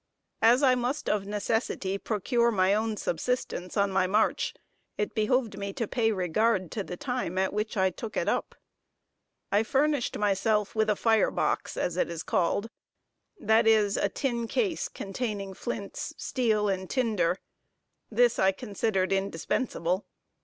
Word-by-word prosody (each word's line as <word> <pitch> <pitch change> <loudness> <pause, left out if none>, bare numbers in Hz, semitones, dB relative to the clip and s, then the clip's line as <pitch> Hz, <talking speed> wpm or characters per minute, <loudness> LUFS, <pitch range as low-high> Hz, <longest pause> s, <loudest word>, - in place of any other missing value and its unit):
As 240 +5 +5
I 260 -2 +6
must 255 +4 -2
of 200 -2 0
necessity 205 -2 -1
procure 235 +3 +1
my 190 -3 +3
own 215 0 0
subsistence 180 0 -2
on 200 -1 +2
my 190 -1 +2
march, 210 +4 +1 0.4
it 210 - -2
behoved 220 -1 +1
me 200 0 -4
to 230 - -2
pay 225 -1 +1
regard 185 0 +1
to 210 - -3
the 180 - -7
time 245 -9 -3
at 190 0 +1
which 210 +1 -2
I 190 -1 +3
took 215 +5 -7
it - - 0
up. - - -1 1.0
I 205 - +4
furnished 280 +3 +1
myself 210 +1 +1
with 220 -1 +1
a 210 - +3
fire 225 +1 +3
box, - - -1
as 175 0 -1
it - - +1
is 170 -1 -5
called, 185 +5 0 0.7
that 220 +2 +3
is, 215 -2 +4
a - - +1
tin 235 -4 -2
case 380 - -1
containing 200 -2 -4
flints, - - -5
steel 220 -5 +1
and 190 -2 -2
tinder 210 -9 +1 0.7
this 240 +1 +3
I 190 0 +4
considered 195 -2 -1
indispensable. 190 0 -1
210 Hz, 155 wpm, -28 LUFS, 190-235 Hz, 1.0 s, I